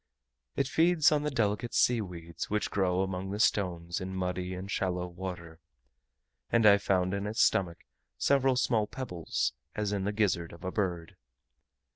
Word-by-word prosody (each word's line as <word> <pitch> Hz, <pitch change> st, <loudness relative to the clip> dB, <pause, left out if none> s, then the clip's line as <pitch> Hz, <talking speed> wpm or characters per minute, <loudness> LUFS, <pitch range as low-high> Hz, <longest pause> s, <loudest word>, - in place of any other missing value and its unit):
It 135 Hz, -, +1 dB
feeds 160 Hz, +1 st, +4 dB
on 150 Hz, -1 st, +2 dB
the 150 Hz, -, -1 dB
delicate 115 Hz, -3 st, -1 dB
sea 120 Hz, -2 st, +3 dB
weeds 85 Hz, -4 st, -7 dB
which 105 Hz, 0 st, -1 dB
grow 95 Hz, -2 st, +1 dB
among 95 Hz, 0 st, -4 dB
the 100 Hz, +1 st, -4 dB
stones 90 Hz, -4 st, 0 dB
in 95 Hz, 0 st, -5 dB
muddy 90 Hz, 0 st, -2 dB
and 95 Hz, +2 st, -6 dB
shallow 90 Hz, -1 st, -1 dB
water; 85 Hz, -2 st, -7 dB, 0.9 s
and 115 Hz, -1 st, +3 dB
I 100 Hz, -1 st, +7 dB
found 95 Hz, -2 st, +1 dB
in 100 Hz, +1 st, -2 dB
its 110 Hz, +2 st, +2 dB
stomach 85 Hz, -3 st, +1 dB, 0.3 s
several 135 Hz, -2 st, +3 dB
small 115 Hz, -4 st, +1 dB
pebbles, 90 Hz, -, -3 dB, 0.2 s
as 105 Hz, -1 st, -1 dB
in 95 Hz, -2 st, -1 dB
the 105 Hz, -, 0 dB
gizzard 95 Hz, -6 st, 0 dB
of 85 Hz, -, -13 dB
a 90 Hz, -, -3 dB
bird. 90 Hz, -5 st, -3 dB
95 Hz, 165 wpm, -30 LUFS, 90-110 Hz, 0.9 s, I